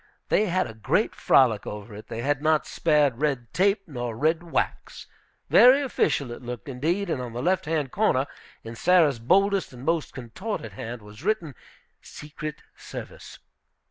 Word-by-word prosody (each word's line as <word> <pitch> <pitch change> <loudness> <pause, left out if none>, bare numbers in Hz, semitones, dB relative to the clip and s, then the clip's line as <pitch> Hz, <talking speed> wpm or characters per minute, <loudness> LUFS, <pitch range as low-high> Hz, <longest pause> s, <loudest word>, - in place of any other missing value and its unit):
They 215 - +3
had 185 +1 +1
a 110 - -8
great 110 -2 0
frolic 115 -6 +3
over 105 +1 -7
it. 105 +1 -10
They 115 0 -5
had 145 0 0
not 155 0 +2
spared 150 -6 +2
red 135 -6 -1
tape 195 +2 +2
nor 120 -6 -5
red 160 +5 +1
wax. 170 -1 -3 0.4
Very 265 +3 +7
official 140 - 0
it 120 - -8
looked, 120 -3 -7
indeed, 160 +10 -1
and 150 -6 -2
on 120 -2 -6
the 120 - -4
left 185 +2 +1
hand 150 -5 -1
corner, 170 -11 +2 0.4
in 115 +1 -8
Sarah's 160 -4 +3
boldest 195 - +2
and 125 +1 -10
most 165 0 0
contorted 125 - -6
hand, 115 +1 -7
was 105 +3 -13
written, 195 -8 -1 0.5
"Secret 150 0 -8
service." - - -9
145 Hz, 165 wpm, -25 LUFS, 120-175 Hz, 0.5 s, Very